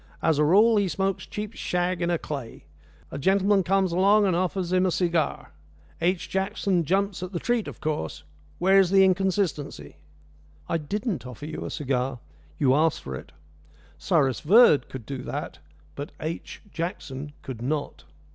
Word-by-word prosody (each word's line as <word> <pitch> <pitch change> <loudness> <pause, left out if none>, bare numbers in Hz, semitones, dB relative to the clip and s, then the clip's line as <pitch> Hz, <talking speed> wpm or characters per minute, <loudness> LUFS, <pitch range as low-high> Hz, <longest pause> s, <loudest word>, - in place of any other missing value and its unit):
As 155 -2 +2
a - - +5
rule 210 +8 +5
he 200 -1 +2
smokes 190 +3 -2
cheap 210 +1 -5
shag 180 -2 -1
in 170 - 0
a 170 - +2
clay. 140 -7 -7 0.5
A 140 - -5
gentleman 195 +4 +3
comes 190 0 +1
along 200 +4 +4
and 185 -3 +2
offers 185 0 -1
him 185 0 +3
a - - +1
cigar. 170 -4 0 0.5
H. 180 +1 0
Jackson 190 -2 0
jumps 195 +1 0
at 185 +1 -6
the 170 - -2
treat, 240 +1 0
of - - -8
course. 150 - -3 0.3
Where's 190 0 +4
the 195 0 +6
inconsistency?" 185 - -1 0.7
"I 165 - 0
didn't 190 - -3
offer 125 +3 -8
you 155 0 -5
a - - -4
cigar. 130 -2 -2 0.4
You 130 -3 +3
asked 155 +2 +2
for 65 - -6
it. 65 - -8 0.7
Cyrus 135 - +2
Verd 195 - +5
could 130 -4 -8
do 135 +1 -5
that, - - -5 0.3
but 145 - -7
H. 160 +2 -6
Jackson 150 -4 -5
could 125 -4 -7
not." 145 - -3
175 Hz, 165 wpm, -26 LUFS, 145-195 Hz, 0.7 s, the